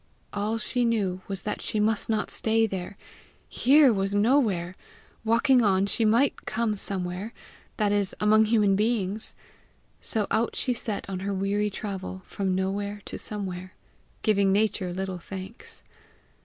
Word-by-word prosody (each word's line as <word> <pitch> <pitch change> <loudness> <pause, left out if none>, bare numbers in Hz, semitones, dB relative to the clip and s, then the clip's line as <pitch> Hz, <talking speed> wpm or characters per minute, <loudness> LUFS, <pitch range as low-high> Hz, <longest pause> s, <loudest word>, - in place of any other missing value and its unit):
All 210 +2 -1
she 245 +3 0
knew 200 -6 0
was 195 -1 -5
that 210 - -3
she 215 - -1
must 215 +1 +1
not 215 -1 0
stay 225 0 +3
there. 190 -1 -5 0.5
Here 275 -1 +5
was 195 0 -1
nowhere; 205 -6 +2 0.5
walking 230 +3 +4
on 195 -3 +3
she 220 +3 +1
might 235 +6 +2
come 230 -1 0
somewhere 195 +1 -3 0.4
that 210 -2 +2
is, 205 -2 +1
among 215 +1 +5
human 210 -3 +3
beings! 215 -1 -1 0.7
So 215 -2 -1
out 225 +2 +1
she 250 - 0
set 220 -3 -4
on 190 -1 -4
her 200 +1 -2
weary 200 +2 0
travel 190 -2 -6
from 190 -2 -2
no 190 0 0
where 205 0 -4
to - - -6
somewhere, 185 -3 -5 0.5
giving 200 -2 +3
Nature 200 -2 +1
little 190 0 -4
thanks. 190 +4 -9
205 Hz, 150 wpm, -26 LUFS, 190-220 Hz, 0.7 s, Here